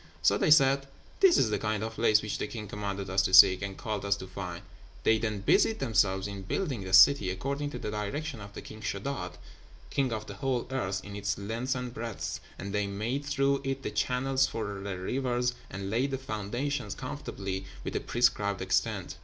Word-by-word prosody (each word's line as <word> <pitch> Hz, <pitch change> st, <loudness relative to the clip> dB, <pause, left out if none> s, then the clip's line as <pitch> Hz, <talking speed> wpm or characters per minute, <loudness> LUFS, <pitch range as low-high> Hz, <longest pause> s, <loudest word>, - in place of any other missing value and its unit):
So -, -, +5 dB
they -, -, +1 dB
said, 135 Hz, -2 st, +5 dB, 0.3 s
"This 385 Hz, -5 st, +6 dB
is 110 Hz, -, +3 dB
the 105 Hz, -, 0 dB
kind 110 Hz, 0 st, -1 dB
of 110 Hz, 0 st, -4 dB
place 110 Hz, -1 st, +3 dB
which 105 Hz, -2 st, -3 dB
the -, -, -2 dB
king 105 Hz, -2 st, -6 dB
commanded 100 Hz, -1 st, -4 dB
us 95 Hz, +1 st, +2 dB
to 95 Hz, -1 st, +3 dB
seek, 95 Hz, +1 st, +9 dB
and 100 Hz, -1 st, -5 dB
called 105 Hz, -3 st, -3 dB
us 100 Hz, 0 st, +2 dB
to 100 Hz, -, -8 dB
find." 90 Hz, -2 st, -6 dB, 0.4 s
They 110 Hz, 0 st, +4 dB
then 110 Hz, -3 st, -2 dB
busied 220 Hz, -, +3 dB
themselves 100 Hz, -7 st, +1 dB
in 100 Hz, -1 st, -5 dB
building 130 Hz, -, -2 dB
the 95 Hz, -, -6 dB
city 95 Hz, +2 st, +7 dB
according 140 Hz, +10 st, -2 dB
to -, -, -6 dB
the 105 Hz, -, -4 dB
direction 105 Hz, +5 st, -4 dB
of 100 Hz, 0 st, -9 dB
the -, -, -8 dB
King 110 Hz, 0 st, -10 dB
Sheddád, 110 Hz, +7 st, -3 dB, 0.6 s
king 135 Hz, -3 st, +1 dB
of 110 Hz, -1 st, -3 dB
the -, -, -8 dB
whole 130 Hz, -3 st, -1 dB
earth, 100 Hz, -8 st, -2 dB
in 100 Hz, -1 st, -8 dB
its 100 Hz, -1 st, -2 dB
length 115 Hz, +6 st, -2 dB
and 125 Hz, -1 st, -4 dB
breadth; 115 Hz, -3 st, -4 dB, 0.2 s
and 100 Hz, 0 st, -6 dB
they 105 Hz, -1 st, 0 dB
made 110 Hz, +8 st, -2 dB
through 140 Hz, 0 st, +1 dB
it 135 Hz, 0 st, -3 dB
the -, -, -3 dB
channels 130 Hz, +5 st, +1 dB
for 100 Hz, -3 st, -4 dB
the 100 Hz, -2 st, -4 dB
rivers, 125 Hz, +4 st, -1 dB, 0.2 s
and 100 Hz, 0 st, -5 dB
laid 125 Hz, +5 st, +1 dB
the 135 Hz, -, -2 dB
foundations 120 Hz, 0 st, -3 dB
conformably 95 Hz, -1 st, -5 dB, 0.2 s
with -, -, -4 dB
the -, -, 0 dB
prescribed 105 Hz, -5 st, +1 dB
extent. -, -, -1 dB
110 Hz, 205 wpm, -29 LUFS, 100-130 Hz, 0.6 s, seek